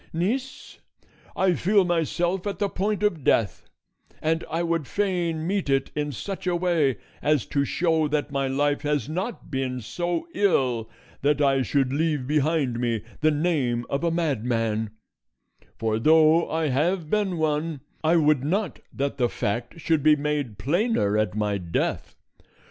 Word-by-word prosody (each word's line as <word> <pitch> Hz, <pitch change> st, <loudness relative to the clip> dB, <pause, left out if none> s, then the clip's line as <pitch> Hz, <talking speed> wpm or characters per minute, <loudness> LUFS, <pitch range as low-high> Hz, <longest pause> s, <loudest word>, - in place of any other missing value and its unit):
Niece, 245 Hz, +11 st, -3 dB, 0.6 s
I 190 Hz, -1 st, +3 dB
feel 195 Hz, +3 st, +3 dB
myself 175 Hz, +2 st, 0 dB
at 200 Hz, -3 st, -3 dB
the 200 Hz, +1 st, 0 dB
point 205 Hz, +1 st, -1 dB
of 175 Hz, -9 st, +1 dB
death, 110 Hz, -7 st, +1 dB, 0.5 s
and 160 Hz, +1 st, 0 dB
I 165 Hz, +2 st, -1 dB
would 165 Hz, -4 st, -1 dB
fain 175 Hz, -5 st, -1 dB
meet 195 Hz, -3 st, -1 dB
it 135 Hz, -1 st, +1 dB
in 150 Hz, -1 st, -1 dB
such 190 Hz, -, -6 dB
a 180 Hz, -, +2 dB
way 170 Hz, -, +1 dB, 0.2 s
as 145 Hz, -7 st, +2 dB
to 140 Hz, +4 st, 0 dB
show 160 Hz, 0 st, +1 dB
that 150 Hz, 0 st, -1 dB
my 140 Hz, -1 st, 0 dB
life 145 Hz, +2 st, +1 dB
has 145 Hz, -5 st, -1 dB
not 185 Hz, +3 st, -4 dB
been 130 Hz, -2 st, -2 dB
so 170 Hz, +9 st, -3 dB
ill 130 Hz, -, +1 dB, 0.3 s
that 145 Hz, +1 st, +2 dB
I 135 Hz, -2 st, +3 dB
should 135 Hz, +1 st, +1 dB
leave 150 Hz, -3 st, 0 dB
behind 145 Hz, -3 st, +1 dB
me 115 Hz, -3 st, -1 dB, 0.2 s
the 155 Hz, -, +3 dB
name 145 Hz, -7 st, 0 dB
of 140 Hz, +4 st, -1 dB
a 170 Hz, -, +2 dB
madman; 115 Hz, -9 st, 0 dB, 0.9 s
for 110 Hz, -1 st, 0 dB
though 160 Hz, +4 st, +5 dB
I 160 Hz, -1 st, 0 dB
have 160 Hz, +6 st, 0 dB
been 205 Hz, -4 st, +1 dB
one, 155 Hz, -1 st, -1 dB, 0.2 s
I 160 Hz, +2 st, +4 dB
would 150 Hz, -4 st, +3 dB
not 185 Hz, +5 st, -1 dB
that 140 Hz, 0 st, -2 dB
the 120 Hz, -2 st, +2 dB
fact 120 Hz, +9 st, -3 dB
should 160 Hz, -2 st, +1 dB
be 155 Hz, +1 st, +6 dB
made 145 Hz, -7 st, -2 dB
plainer 150 Hz, -, +1 dB
at 105 Hz, -2 st, 0 dB
my 105 Hz, -2 st, 0 dB
death. 85 Hz, -2 st, -2 dB
150 Hz, 160 wpm, -25 LUFS, 130-170 Hz, 0.9 s, be